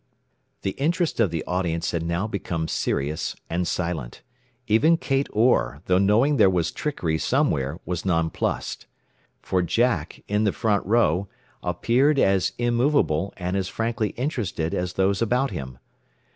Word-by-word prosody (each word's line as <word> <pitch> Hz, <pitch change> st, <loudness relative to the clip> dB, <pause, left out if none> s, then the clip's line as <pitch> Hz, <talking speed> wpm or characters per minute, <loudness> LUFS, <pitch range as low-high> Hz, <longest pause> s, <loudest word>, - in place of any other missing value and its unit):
The 95 Hz, -, 0 dB
interest 165 Hz, +2 st, 0 dB
of 110 Hz, -5 st, +4 dB
the 80 Hz, -1 st, -3 dB
audience 90 Hz, -2 st, -1 dB
had 85 Hz, -, -1 dB
now 85 Hz, +4 st, -1 dB
become 90 Hz, -6 st, -3 dB
serious 75 Hz, +1 st, -2 dB, 0.2 s
and 85 Hz, +1 st, 0 dB
silent. 85 Hz, -9 st, -3 dB, 0.4 s
Even 145 Hz, +11 st, +4 dB
Kate 135 Hz, -3 st, 0 dB
Orr, 110 Hz, -, +2 dB
though 90 Hz, 0 st, +3 dB
knowing 115 Hz, +9 st, +3 dB
there 100 Hz, -4 st, +6 dB
was 90 Hz, -3 st, 0 dB
trickery 85 Hz, -, -2 dB
somewhere, 80 Hz, -, 0 dB
was 90 Hz, -2 st, -3 dB
nonplussed. 80 Hz, -3 st, -1 dB, 0.6 s
For 95 Hz, -, +1 dB
Jack, 90 Hz, -2 st, 0 dB
in 105 Hz, +1 st, +1 dB
the 100 Hz, -, +2 dB
front 105 Hz, -4 st, +1 dB
row, 100 Hz, -4 st, +2 dB, 0.3 s
appeared 120 Hz, -, +2 dB
as 95 Hz, -6 st, +2 dB
immovable, 120 Hz, -, +1 dB
and 90 Hz, +1 st, -2 dB
as 95 Hz, -2 st, -1 dB
frankly 115 Hz, +1 st, -1 dB
interested 110 Hz, -, -2 dB
as 90 Hz, 0 st, -2 dB
those 95 Hz, +2 st, +1 dB
about 125 Hz, +4 st, +1 dB
him. 65 Hz, -8 st, -6 dB
95 Hz, 145 wpm, -24 LUFS, 85-120 Hz, 0.6 s, there